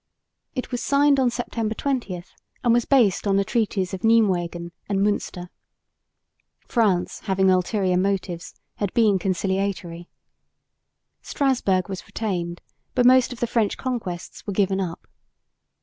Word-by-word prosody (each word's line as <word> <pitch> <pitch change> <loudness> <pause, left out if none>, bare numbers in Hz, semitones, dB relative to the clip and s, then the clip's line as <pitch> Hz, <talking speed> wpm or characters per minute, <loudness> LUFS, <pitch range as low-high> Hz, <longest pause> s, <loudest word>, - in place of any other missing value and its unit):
It 255 0 -4
was 245 - -2
signed 280 0 +3
on 255 -2 +3
September 230 -2 -3
20 235 -11 -2 0.4
and 240 -2 +4
was 240 0 +2
based 230 -9 +3
upon 195 - +3
the 200 - +2
treaties 200 -5 -1
of 190 - -4
Nijmwegen 180 -6 +2 0.2
and 200 -1 +1
Münster. 195 -3 -1 1.2
France, 205 -7 +1
having 190 -1 +3
ulterior 185 0 +1
motives, 185 -2 -2 0.2
had 205 -3 -1
been 215 -5 +4
conciliatory. 190 -2 -2 1.1
Strasburg 235 -10 +1
was 190 -2 -7
retained, 175 -6 -3 0.3
but 245 - +3
most 255 0 +6
of 245 - -8
the - - +3
French 225 -3 0
conquests 215 -11 -5
were 200 - -2
given 195 0 +1
up. 170 -3 -5
200 Hz, 135 wpm, -23 LUFS, 185-235 Hz, 1.2 s, most